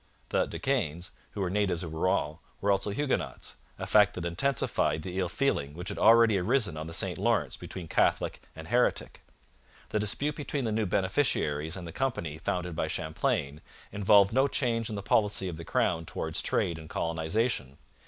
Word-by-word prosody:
The -, -, +1 dB
De -, -, -6 dB
Caens, 90 Hz, -, -1 dB, 0.2 s
who 100 Hz, -, -4 dB
were 95 Hz, -, 0 dB
natives 95 Hz, -3 st, 0 dB
of 80 Hz, -2 st, -6 dB
Rouen, 80 Hz, -2 st, 0 dB, 0.2 s
were 100 Hz, -, +2 dB
also 100 Hz, +1 st, +1 dB
Huguenots, 135 Hz, +7 st, -2 dB, 0.2 s
a -, -, -4 dB
fact 105 Hz, -1 st, +4 dB
that 90 Hz, -, -4 dB
intensified 85 Hz, -, 0 dB
the 95 Hz, +2 st, -4 dB
ill 90 Hz, -2 st, 0 dB
feeling 75 Hz, -, -1 dB
which 90 Hz, +1 st, -5 dB
had -, -, -5 dB
already 115 Hz, -2 st, +6 dB
arisen 105 Hz, -, +1 dB
on 80 Hz, +1 st, -5 dB
the -, -, -7 dB
St -, -, -1 dB
Lawrence -, -, +1 dB
between 90 Hz, -3 st, -8 dB
Catholic -, -, +1 dB
and 80 Hz, 0 st, -9 dB
heretic. 120 Hz, +4 st, 0 dB, 0.7 s
The 105 Hz, -, 0 dB
dispute 140 Hz, +8 st, 0 dB
between 145 Hz, -3 st, -3 dB
the 110 Hz, -, -1 dB
new 110 Hz, -1 st, 0 dB
beneficiaries 90 Hz, -, 0 dB
and 90 Hz, -, -7 dB
the -, -, -7 dB
company 85 Hz, -, -2 dB
founded 90 Hz, 0 st, -2 dB
by 80 Hz, -, -1 dB
Champlain 75 Hz, -2 st, -2 dB, 0.3 s
involved 100 Hz, 0 st, +4 dB
no 135 Hz, +3 st, +4 dB
change 120 Hz, -5 st, 0 dB
in 110 Hz, -, -4 dB
the 100 Hz, -, -5 dB
policy 100 Hz, -2 st, +2 dB
of 85 Hz, -3 st, -5 dB
the 85 Hz, -, -7 dB
crown 80 Hz, +2 st, 0 dB
towards -, -, -1 dB
trade 85 Hz, -2 st, 0 dB
and 80 Hz, 0 st, -11 dB
colonization. 80 Hz, -, -1 dB
95 Hz, 185 wpm, -29 LUFS, 80-110 Hz, 0.7 s, already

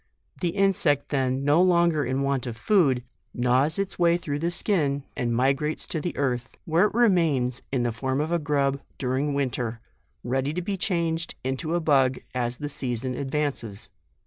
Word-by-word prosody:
The 175 Hz, -, 0 dB
insect 175 Hz, -6 st, +1 dB
then, 130 Hz, -1 st, 0 dB
no 150 Hz, +4 st, +5 dB
lon 170 Hz, -2 st, +4 dB
ger 150 Hz, -2 st, 0 dB
in 130 Hz, +2 st, -1 dB
want 140 Hz, -2 st, -1 dB
of 115 Hz, -2 st, -5 dB
food, 135 Hz, -, +3 dB, 0.3 s
gnaws 125 Hz, +6 st, +3 dB
its 195 Hz, -1 st, -3 dB
way 170 Hz, 0 st, +4 dB
through 145 Hz, -4 st, -4 dB
the 170 Hz, +2 st, 0 dB
skin, 150 Hz, -7 st, 0 dB
and 120 Hz, -1 st, -1 dB
migrates 135 Hz, +5 st, +1 dB
to 160 Hz, -, -3 dB
the 175 Hz, -, -4 dB
earth, 125 Hz, -3 st, -2 dB
where 170 Hz, +5 st, +3 dB
it -, -, -9 dB
remains 165 Hz, -, +2 dB
in 130 Hz, -3 st, +1 dB
the 120 Hz, -, 0 dB
form 130 Hz, +4 st, -2 dB
of 155 Hz, +2 st, -1 dB
a 170 Hz, -, +2 dB
grub 140 Hz, -2 st, 0 dB, 0.2 s
during 135 Hz, +2 st, -1 dB
winter, 125 Hz, -4 st, -2 dB, 0.4 s
ready 135 Hz, +4 st, -1 dB
to 180 Hz, -, -1 dB
be 195 Hz, +2 st, -2 dB
changed 170 Hz, -3 st, -1 dB
into 135 Hz, +6 st, -2 dB
a -, -, +2 dB
bug, 135 Hz, -5 st, +3 dB, 0.2 s
as 120 Hz, -1 st, -2 dB
the 145 Hz, -, -4 dB
season 130 Hz, -3 st, -3 dB
advances. 135 Hz, -7 st, -3 dB
140 Hz, 180 wpm, -25 LUFS, 130-170 Hz, 0.4 s, no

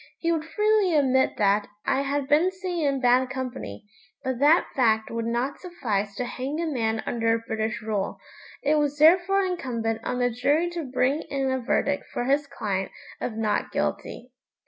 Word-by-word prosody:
He 335 Hz, -, 0 dB
would 320 Hz, -2 st, -1 dB
freely 420 Hz, -1 st, +2 dB
admit 265 Hz, -3 st, +2 dB
that. 205 Hz, 0 st, +2 dB, 0.2 s
I 270 Hz, -, +2 dB
had 280 Hz, 0 st, -1 dB
been 310 Hz, +6 st, +4 dB
seen 365 Hz, -4 st, -2 dB
in 275 Hz, -1 st, 0 dB
bad 250 Hz, +1 st, +4 dB
company, 245 Hz, -, -6 dB, 0.4 s
but 260 Hz, -2 st, -2 dB
that 300 Hz, +5 st, +5 dB
fact 220 Hz, -4 st, +2 dB
would 230 Hz, 0 st, -2 dB
not 240 Hz, +4 st, -1 dB
suffice 215 Hz, -, -3 dB
to 250 Hz, -, -2 dB
hang 265 Hz, +5 st, -4 dB
a 340 Hz, -, 0 dB
man 225 Hz, -7 st, -1 dB
under 225 Hz, -1 st, +1 dB
British 220 Hz, +1 st, -2 dB
rule. 210 Hz, -3 st, -2 dB, 0.5 s
It 300 Hz, +2 st, +3 dB
was 290 Hz, -1 st, 0 dB
therefore 365 Hz, +5 st, +5 dB
incumbent 230 Hz, -11 st, -2 dB
on 250 Hz, -, -2 dB
the 245 Hz, 0 st, +1 dB
jury 290 Hz, +9 st, +1 dB
to 340 Hz, -3 st, -4 dB
bring 265 Hz, +4 st, +1 dB
in 270 Hz, -1 st, -1 dB
a 260 Hz, -, 0 dB
verdict 280 Hz, +3 st, 0 dB
for -, -, -2 dB
his 280 Hz, +2 st, +1 dB
client 195 Hz, -7 st, -3 dB, 0.3 s
of 240 Hz, -, -3 dB
"not 215 Hz, -2 st, 0 dB
guilty".' 250 Hz, +2 st, -3 dB
260 Hz, 175 wpm, -25 LUFS, 230-305 Hz, 0.5 s, that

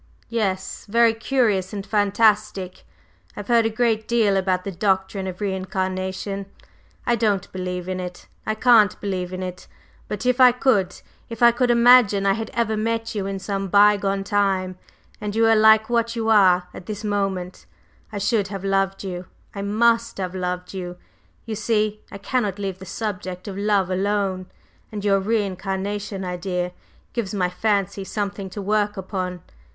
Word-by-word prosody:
"Yes; 195 Hz, -5 st, -2 dB
very 230 Hz, +1 st, +4 dB
curious 225 Hz, -5 st, 0 dB
and 200 Hz, -1 st, -5 dB
fantastic. 210 Hz, -3 st, +1 dB, 0.5 s
I've 205 Hz, +1 st, -7 dB
heard 230 Hz, -1 st, +4 dB
a -, -, -1 dB
great 220 Hz, -1 st, 0 dB
deal 225 Hz, -4 st, +2 dB
about 185 Hz, -1 st, 0 dB
the 195 Hz, -, -4 dB
doctrine 190 Hz, +1 st, 0 dB
of 185 Hz, -1 st, -6 dB
re 200 Hz, -2 st, 0 dB
incarnation. 190 Hz, +1 st, -3 dB, 0.6 s
I 240 Hz, -, +2 dB
don't 205 Hz, -4 st, 0 dB
believe 180 Hz, -1 st, -4 dB
in 185 Hz, 0 st, -3 dB
it, 180 Hz, -1 st, -7 dB, 0.2 s
I 215 Hz, -, -2 dB
can't 220 Hz, -3 st, +4 dB
believe 185 Hz, -3 st, -3 dB
in 185 Hz, 0 st, -4 dB
it! 180 Hz, 0 st, -7 dB, 0.4 s
But 210 Hz, +3 st, -5 dB
if 250 Hz, +1 st, +2 dB
I 250 Hz, -1 st, +8 dB
could: 215 Hz, -8 st, +1 dB, 0.3 s
if 230 Hz, 0 st, -4 dB
I 235 Hz, -, +8 dB
could 245 Hz, +1 st, 0 dB
imagine 235 Hz, -4 st, +6 dB
I 195 Hz, -, +4 dB
had 225 Hz, +2 st, -4 dB
ever 230 Hz, -2 st, +1 dB
met 225 Hz, +1 st, -2 dB
you 200 Hz, -3 st, -2 dB
in 195 Hz, 0 st, -3 dB
some 195 Hz, 0 st, -3 dB
bygone 200 Hz, 0 st, +3 dB
time, 195 Hz, -2 st, 0 dB, 0.5 s
and 210 Hz, 0 st, -4 dB
you 225 Hz, -, +3 dB
were 225 Hz, 0 st, +5 dB
like 220 Hz, 0 st, +6 dB
what 235 Hz, 0 st, 0 dB
you 225 Hz, -1 st, -1 dB
are 185 Hz, -4 st, +5 dB
at 180 Hz, -, -11 dB
this 210 Hz, 0 st, -5 dB
moment, 195 Hz, -3 st, -2 dB, 0.4 s
I 210 Hz, -, -5 dB
should 205 Hz, 0 st, +1 dB
have 195 Hz, -1 st, -6 dB
loved 195 Hz, 0 st, 0 dB
you, 180 Hz, -2 st, -6 dB, 0.3 s
I 200 Hz, -, -5 dB
must 230 Hz, +3 st, +2 dB
have 185 Hz, -2 st, -3 dB
loved 180 Hz, 0 st, -4 dB
you! 180 Hz, -2 st, -6 dB, 0.5 s
You 225 Hz, -, -4 dB
see 215 Hz, 0 st, 0 dB
I -, -, -7 dB
cannot 205 Hz, -2 st, -1 dB
leave 195 Hz, -2 st, -4 dB
the 190 Hz, -, -10 dB
subject 185 Hz, -2 st, -5 dB
of 195 Hz, -, -5 dB
love 200 Hz, -2 st, +1 dB
alone; 190 Hz, -1 st, -1 dB, 0.4 s
and 210 Hz, -1 st, -5 dB
your 195 Hz, -1 st, +4 dB
re 215 Hz, +2 st, +1 dB
incarnation 195 Hz, +1 st, -4 dB
idea 180 Hz, 0 st, -3 dB, 0.4 s
gives 215 Hz, -4 st, -3 dB
my 180 Hz, -2 st, +1 dB
fancy 200 Hz, 0 st, 0 dB
something 200 Hz, -1 st, -4 dB
to 200 Hz, +2 st, -6 dB
work 210 Hz, 0 st, 0 dB
upon. 185 Hz, -2 st, -4 dB
200 Hz, 170 wpm, -23 LUFS, 190-220 Hz, 0.6 s, I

